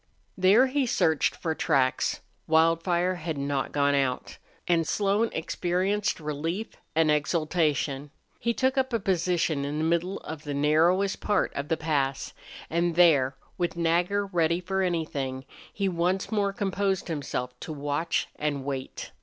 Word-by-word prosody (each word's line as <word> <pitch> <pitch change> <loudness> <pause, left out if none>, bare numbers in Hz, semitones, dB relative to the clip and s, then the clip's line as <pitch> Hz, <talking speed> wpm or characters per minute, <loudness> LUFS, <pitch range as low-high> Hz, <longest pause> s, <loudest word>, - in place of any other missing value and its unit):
There 195 +7 +5
he 270 0 0
searched 160 -9 +2
for 160 -2 -2
tracks. 135 -5 +1 0.3
Wildfire 165 +3 +3
had 160 -2 -4
not 140 0 -2
gone 145 0 +2
out, 135 -3 -1 0.3
and 165 -2 +2
Slone 205 +3 +1
experienced 185 +5 -1
relief 165 +8 -3 0.3
and 160 -1 +4
exultation. 150 -2 0 0.3
He 235 - 0
took 260 +3 +1
up 260 -1 -1
a 230 - +2
position 175 -6 0
in 145 +2 -3
the 155 - -1
middle 170 +4 0
of 160 -1 -7
the 145 -1 -4
narrowest 165 +7 +2
part 205 - +1
of 140 +1 -4
the 160 - 0
pass, 140 -4 -1 0.3
and 170 0 0
there, 145 -7 +5 0.2
with 175 -1 -1
Nagger 175 +4 +1
ready 170 -3 +1
for 190 +2 -2
anything, 145 -7 -2 0.3
he 200 -1 -1
once 180 +3 0
more 205 -2 +1
composed 195 -1 -1
himself 135 -6 -3
to - - -7
watch 145 +3 -1
and 145 -3 -2
wait. 135 -2 -5
165 Hz, 145 wpm, -27 LUFS, 145-190 Hz, 0.3 s, There